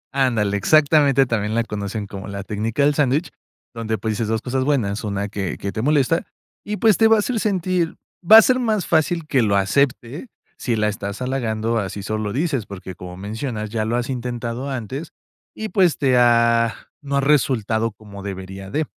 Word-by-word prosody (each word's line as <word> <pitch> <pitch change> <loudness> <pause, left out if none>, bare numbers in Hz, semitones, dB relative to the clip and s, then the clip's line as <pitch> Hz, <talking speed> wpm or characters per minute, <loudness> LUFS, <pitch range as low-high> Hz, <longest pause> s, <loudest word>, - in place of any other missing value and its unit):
Ándale, 110 -7 +1
exactamente, 145 - +4
también 110 -3 -1
la 115 - +2
conocen 105 -1 -4
como 100 0 -8
la 100 -1 -5
técnica 110 +6 -1
del 145 - +3
sándwich, 145 +3 +1 0.4
donde, 110 -1 -3
pues, 110 +2 -2
dices 110 +1 -2
dos 110 0 -1
cosas 130 +1 -1
buenas, 115 -8 0
una 100 -1 -2
que 100 -2 -4
que 100 - -4
te 110 - -3
molesta, 150 +4 +2 0.4
y, 210 +1 -4
pues, 220 -2 +4
te 225 - +5
va 225 - +6
a - - +2
hacer 225 +2 -1
sentir 185 -4 0 0.3
va 215 +6 +9
a - - +11
ser 255 +2 +3
más 215 -7 0
fácil 160 +1 +1
que 135 -4 +2
lo 100 -3 +2
acepte 125 - 0 0.3
si 120 - -2
la 105 0 +1
estás 100 +1 -4
halagando, 115 -3 -1
a 100 -3 -3
si 100 - -7
solo 110 +1 -3
lo 105 - -2
dices 140 -4 -1
porque, 95 -1 -8
como 90 0 -9
mencionas, 110 +2 -4
ya 110 -1 -1
lo 115 +2 -1
has 120 +1 -3
intentado 120 +1 -4
antes 135 +5 -5 0.4
y, 220 0 -5
pues, 180 -4 +3
te 130 -3 +2
ha 115 -2 +4 0.3
no 140 -1 -2
ha - - +2
resultado 115 -6 +1
como 100 -2 -12
debería 95 0 -7
de. 155 +8 -1
120 Hz, 200 wpm, -21 LUFS, 105-145 Hz, 0.4 s, a